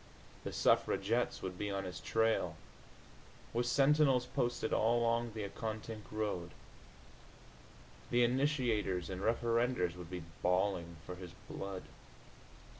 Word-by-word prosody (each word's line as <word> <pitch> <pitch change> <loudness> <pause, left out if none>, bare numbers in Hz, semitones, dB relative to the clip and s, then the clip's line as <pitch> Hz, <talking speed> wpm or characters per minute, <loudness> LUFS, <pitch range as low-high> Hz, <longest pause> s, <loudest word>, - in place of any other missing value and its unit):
The - - -4
suffragettes 115 +5 +2
would 90 -1 -4
be 105 - -1
on 100 0 -2
his 90 - -5
trail, 110 0 +1 1.0
with 120 +1 +1
sentinels 135 -1 +4
posted 120 -2 -1
all 115 +2 +3
along 115 0 +1
the 110 - -2
Accotink 110 +1 -5
road. 105 -5 -2 1.6
The 120 0 +4
initiators 120 - +1
and 95 0 -4
referendors 115 -4 +1
would 90 -2 -9
be 90 -2 -5 0.2
bawling 90 -2 +1
for 90 - -5
his 90 -2 -9
blood. 95 -1 -5
110 Hz, 115 wpm, -35 LUFS, 95-120 Hz, 1.6 s, sentinels